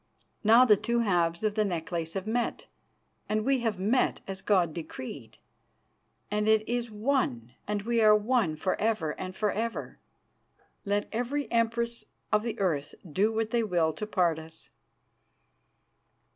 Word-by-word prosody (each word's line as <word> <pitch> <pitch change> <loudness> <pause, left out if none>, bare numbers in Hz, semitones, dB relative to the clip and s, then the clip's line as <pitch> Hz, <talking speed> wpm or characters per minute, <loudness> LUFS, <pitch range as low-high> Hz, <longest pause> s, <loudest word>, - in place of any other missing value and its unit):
Now 230 +4 +7
the 210 -4 +6
two 235 +3 0
halves 175 -4 +1
of 215 -1 +1
the 215 0 +2
necklace 170 -3 -3
have 190 0 -3
met, 235 +2 -1 0.6
and 215 0 0
we 270 -1 +3
have 225 -4 -1
met 215 +7 +1
as 195 0 -6
God 180 -6 +2
decreed, 130 -6 -8 0.9
and 210 0 0
it 220 0 +3
is 240 0 -1
one 210 - -1
and 205 -1 -2
we 235 +1 +1
are 215 -1 +7
one 210 -6 +1
for 170 +4 -1
ever 210 -8 +1
and 185 0 -5
for 210 0 0
ever, 230 +2 -4 0.9
let 205 +1 0
every 245 +5 -2
Empress 235 0 0 0.3
of 210 -1 +4
the 230 +1 -4
earth 155 -7 -1
do 195 +8 +1
what 220 0 -1
they 235 - +2
will 175 -7 +1
to 210 +7 -5
part 175 -6 +1
us." 160 0 -11
210 Hz, 155 wpm, -29 LUFS, 175-230 Hz, 0.9 s, Now